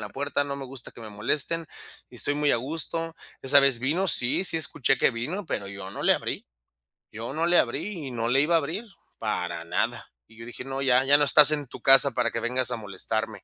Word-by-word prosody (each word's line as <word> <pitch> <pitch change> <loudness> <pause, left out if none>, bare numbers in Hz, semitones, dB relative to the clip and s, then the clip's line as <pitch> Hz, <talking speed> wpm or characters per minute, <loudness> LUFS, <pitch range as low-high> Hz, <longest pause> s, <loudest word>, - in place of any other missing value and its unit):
la 105 - -6
puerta, 145 +1 -2
no 140 0 -5
me 140 - -7
gusta 130 -1 -9
que - - -14
me 110 - -9
molesten, 150 +10 -1 0.4
y - - -14
estoy 145 - -1
muy 150 0 +2
a - - +3
gusto". 165 +5 -4 0.3
¿Esa 135 +1 +5
vez 135 -3 +3
vino? 165 +9 0
Sí, 125 +7 +2
sí 165 - +3
escuché 135 -3 0
que - - +3
vino, 160 - -4
pero 100 -8 -3
yo 95 -1 -8
no - - -7
le - - +5
abrí, - - -4 0.7
yo 115 +4 -7
no 160 +2 -1
le 175 - +4
abrí 185 -8 -3
y - - -6
no 115 -1 -2
le 135 +3 +4
iba 165 +3 +1
a - - +5
abrir, 170 +10 -5 0.3
para 90 -6 -3
nada. - - -2 0.2
Y 110 - -20
yo 115 - -10
dije: 120 - -8
"No, 135 0 -4
ya. 130 0 +4
Ya 145 +1 +6
no 145 - +2
estás 145 +1 +7
en 145 -2 -1
tu - - -12
casa 135 0 +7
para 120 0 0
que - - -3
vengas 125 +1 0
a - - -1
molestarme". 105 0 -4
135 Hz, 240 wpm, -25 LUFS, 115-150 Hz, 0.7 s, estás